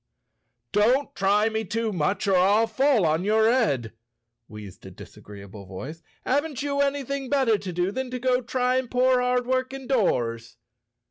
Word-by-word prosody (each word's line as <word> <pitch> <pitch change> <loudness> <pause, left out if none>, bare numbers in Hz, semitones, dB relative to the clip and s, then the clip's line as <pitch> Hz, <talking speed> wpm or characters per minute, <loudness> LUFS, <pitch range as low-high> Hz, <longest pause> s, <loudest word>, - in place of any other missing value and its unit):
"Don't 245 +7 +2
try 205 +2 +2
me 220 0 -2
too 220 +1 -2
much 185 +5 -1
or 195 - +3
I'll 200 +5 +4
fall 240 -2 +2
on 160 +2 +1
your 220 +2 +3
head," 140 - 0 0.5
wheezed 105 -3 -11
a - - -8
disagreeable 100 -1 -12
voice. 135 - -8 0.2
"Haven't 285 0 -1
you 280 -1 -2
anything 275 -1 -2
better 265 -6 +2
to 190 -2 -6
do 180 +2 -1
than 260 +2 -4
go 250 0 0
trying 255 +1 -1
poor 250 +1 +2
hard 250 0 0
working 260 +1 -2
doors?" 120 - -1
225 Hz, 150 wpm, -25 LUFS, 180-260 Hz, 0.5 s, I'll